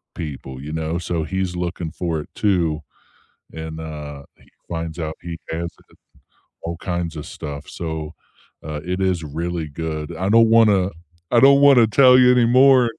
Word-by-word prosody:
people, 65 -4 -7
you 75 +2 -7
know, 80 +1 -2
so 85 -2 -2
he's 95 +1 -3
looking 85 -2 -4
for 85 -4 -3
it - - -13
too. 85 -7 +1 0.7
And, 80 0 -7
uh, 75 -3 -8
he - - -24 0.2
finds 80 0 -5
out 80 -1 -3
he 85 -1 -6
has 85 +1 -3 0.9
all 85 0 -4
kinds 85 -3 -3
of 75 - -6
stuff, 70 -1 -8
so, 80 -2 -5 0.5
uh, 75 -1 -5
it 90 +1 -3
is 90 -4 0
really 85 +2 -4
good. 80 +1 -5
I 95 +3 -2
don't 115 +1 +5
wanna 105 -5 +4 0.4
I 120 - +5
don't 140 +1 +7
wanna 130 -5 +7
tell 125 +2 +6
you 125 0 +6
anymore 125 +2 +5
85 Hz, 160 wpm, -21 LUFS, 80-95 Hz, 0.9 s, don't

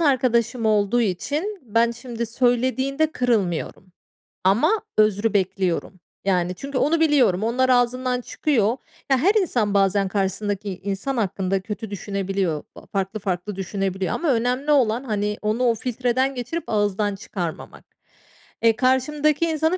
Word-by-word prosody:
arkadaşım 245 -5 +2
olduğu 215 +2 +2
için 290 - -2
ben 230 0 +2
şimdi 235 0 -5
söylediğinde 260 +5 +1
kırılmıyorum 190 -6 -1 0.5
ama 250 - +3 0.2
özrü 215 0 +3
bekliyorum. 190 -2 -1 0.3
Yani 180 -2 +1
çünkü 275 +7 -5
onu 315 +5 +2
biliyorum. 275 - +3
Onlar 250 +3 +1
ağzından 250 0 +2
çıkıyor. 245 -4 0 0.3
Ya, 265 - +5
her 350 +11 +4
insan 235 - 0
bazen 195 0 +3
karşısındaki 195 0 -2
insan 200 +7 -2
hakkında 195 -2 0
kötü 215 +1 -6
düşünebiliyor. 195 -5 -2
Aaa, - - -13
farklı 195 +2 -3
farklı 190 0 -3
düşünebiliyor 190 0 -2
ama 325 -5 0
önemli 250 +5 0
olan, 245 -4 +3
hani, 210 -3 -2
onu 215 +4 0
o 235 -2 +3
filtreden 255 +3 -1
geçirip 255 +8 -4
ağızdan 205 -1 0
çıkarmamak. 180 -4 -6 0.8
E, 230 -1 +4
karşımdaki 290 +6 +2
insanın 320 +2 +1
225 Hz, 130 wpm, -23 LUFS, 195-260 Hz, 0.8 s, Ya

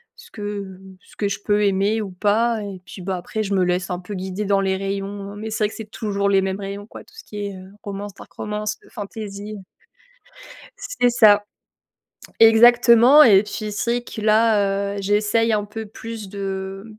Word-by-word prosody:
ce 485 -1 -16
que 200 -3 -6 0.3
ce - - -20
que 205 - -1
je 200 - -3
peux 210 0 +2
aimer 200 +3 +1
ou 195 - -7
pas, 220 +4 +1
et 195 -3 -8
puis 190 - -10
bah, 185 +1 -3
après, 200 +5 -4
je 200 -2 -1
me 185 - +3
laisse 180 +1 -1
un 180 0 -3
peu 185 +3 -8
guider 190 +2 -4
dans 195 0 +2
les 190 -1 0
rayons, 195 +1 -5
mais 215 +2 -6
c'est 220 0 -2
vrai 210 - +2
que - - -11
c'est 220 -2 -8
toujours 200 -2 -1
les 195 -1 +4
mêmes 190 +1 -2
rayons 200 +1 -6
quoi, - - -12
tout - - -22
ce - - -11
qui 205 -1 -6
est, 200 - -7
heu, 185 +1 -13
romance, 200 0 -6
dark - - -14
romance, 210 +1 -4
fantaisie. 205 0 -7 1.2
C'est 245 - 0
ça. 210 -3 +5 0.9
Exactement, 235 +4 +7
et 200 -7 +7
puis, 210 0 -5
c'est 220 +4 -2
vrai 245 0 -1
que 230 - -8
là, 205 -2 +2
j'essaye 210 +3 +1
un 210 -1 +1
peu 220 +1 -7
plus 220 0 -8
de 195 0 -5
205 Hz, 195 wpm, -21 LUFS, 195-220 Hz, 1.2 s, Exactement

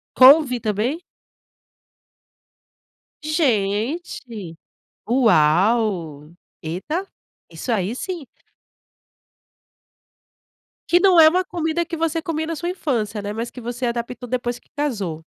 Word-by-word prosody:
Couve 260 -2 +7
também? 225 - -1 2.2
Gente 230 - -1 0.5
uau, 185 - +2 0.3
eta, 250 - -4 0.4
isso 250 - -6
aí 210 0 0
sim. 340 -1 -5 2.6
Que 350 +1 +4
não 375 -3 +5
é 315 - +9
uma 365 +3 +1
comida 340 -1 -2
que 335 0 -5
você 330 0 -1
comia 315 -1 -3
na 330 0 -3
sua 345 - -4
infância, 230 - -2
né, 205 +1 -4
mas 230 +2 -4
que 250 - -10
você 240 +2 -4
adaptou 240 +1 -4
depois 245 -1 -2
que - - -33
casou. 200 - -3
245 Hz, 105 wpm, -21 LUFS, 210-315 Hz, 2.6 s, é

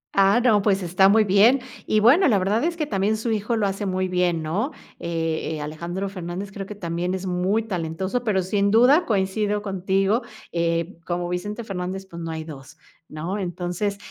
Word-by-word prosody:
Ah, 195 +4 +5
no, 215 -5 +4
pues 195 -2 +1
está 185 +3 +4
muy 220 +1 +5
bien, 210 +7 +5 0.3
y 215 - +3
bueno, 280 - +6
la 215 -6 +4
verdad 200 +5 +1
es 340 0 -1
que 305 - -1
también 210 -2 0
su 225 +1 -2
hijo 215 +2 0
lo 215 -2 +1
hace 195 +1 -2
muy 185 0 0
bien, 175 -3 +1
¿no?, 205 - -1 0.3
eh 165 -1 -2
eh, - - -6
Alejandro 170 +6 -4
Fernández 185 +1 -6
creo 195 -1 -6
que 210 - -7
también 175 0 -2
es 190 - -5
muy 185 +4 0
talentoso, 190 +3 -3
pero 195 -5 +1
sin 200 +2 +1
duda 250 - +5
coincido 205 0 0
contigo, 195 +3 +1 0.3
eh, 170 +1 -1
como 175 0 -2
Vicente 205 +6 -4
Fernández 190 -1 -4
pues 170 -2 -9
no 165 - -5
hay 160 -1 -4
2, 140 -4 -11 0.3
¿no?, 170 +7 -4
entonces, 180 +3 -3
195 Hz, 190 wpm, -23 LUFS, 175-210 Hz, 0.3 s, bueno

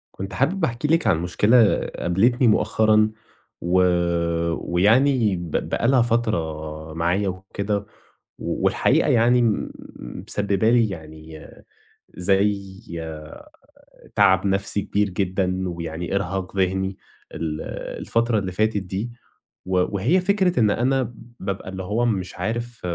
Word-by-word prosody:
كنت 95 0 -6
حابب 180 - +1
أحكي 120 +4 -2
لِك 165 +2 +2
عن 80 - +3
مشكلة 105 +6 +4 0.2
قابلتني 120 +8 +2
مؤخرًا، 110 0 +3 0.5
و 85 +1 -1 1.0
ويعني 110 +4 +3
ب 85 -2 -6 0.2
بقي 115 - 0
لها 130 -1 +4
فترة 80 -10 -2
معايا 85 +5 0
وكده، 100 +2 -3 0.6
و - - -3
والحقيقة - - +3
يعني 120 +2 +4
م 115 -3 0 0.6
مسببة 100 +1 +1
لي 115 -2 +4
يعني 80 -3 -10 0.7
زي 95 +1 0 1.4
تعب 95 +1 +4
نفسي 100 +1 0
كبير 105 +1 0
جدًا 95 0 -1
ويعني 85 +1 -4
إرهاق 95 0 -3
ذهني 95 0 0 0.4
ال 80 -2 -3 0.4
الفترة 115 -1 +1
اللي 95 -2 -4
فاتت 110 +3 +1
دي، 95 +6 -4 0.5
و 95 0 0
وهي 120 - +2
فكرة 190 -4 +2
إن 110 -3 +4
أنا 130 0 0 0.3
بابقى 95 -1 -4
اللي 95 0 -6
هو 105 +6 0
مش 95 -6 -2
عارف 120 +1 -4
100 Hz, 120 wpm, -23 LUFS, 90-115 Hz, 1.4 s, مشكلة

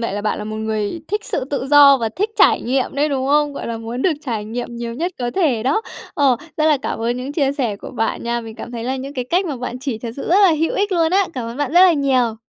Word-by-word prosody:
vậy 230 - -2
là 205 - -3
bạn 215 - -1
là - - -5
một 215 0 -5
người 220 +7 -2
thích 420 +1 -2
sự 365 - -2
tự 270 -1 -3
do 285 -1 +8
và 230 -3 -1
thích 415 +4 0
trải - - +5
nghiệm 260 +2 -1
đấy, 290 +2 +1
đúng 265 -2 -1
không? 295 +1 +2
Gọi - - -6
là, 230 - -3
muốn 230 +3 -5
được 360 - +3
trải 225 -4 -2
nghiệm 235 +2 -5
nhiều 235 0 -5
nhất 345 +8 -2
có 245 -1 -2
thể 285 - +1
đó. 275 - +1 0.3
Ồ, 275 -7 +3 0.2
rất 310 - +1
là 305 -2 +4
cảm - - -3
ơn 235 +2 -1
những 255 +3 -5
chia 280 -3 +1
sẻ 245 -8 -2
của - - -9
bạn 225 -2 -2
nha, 235 0 -1
mình 225 -1 -9
cảm 240 - -9
thấy 230 -1 -5
là 260 +2 -1
những 270 +2 -7
cái 250 -3 -2
cách 360 +8 0
mà 295 -5 -3
bạn 250 0 -5
chỉ 260 -4 -4
thật 230 +1 -5
sự 275 - -5
rất 360 - +4
là 385 - +7
hữu 325 - +1
ích 405 0 0
luôn 330 -2 +2
á! 390 0 +4
Cảm 250 -3 -4
ơn 230 - -7
bạn 285 -1 -2
rất 350 - +6
là 370 -1 +7
nhiều. 260 -6 +1
260 Hz, 300 wpm, -19 LUFS, 235-300 Hz, 0.3 s, do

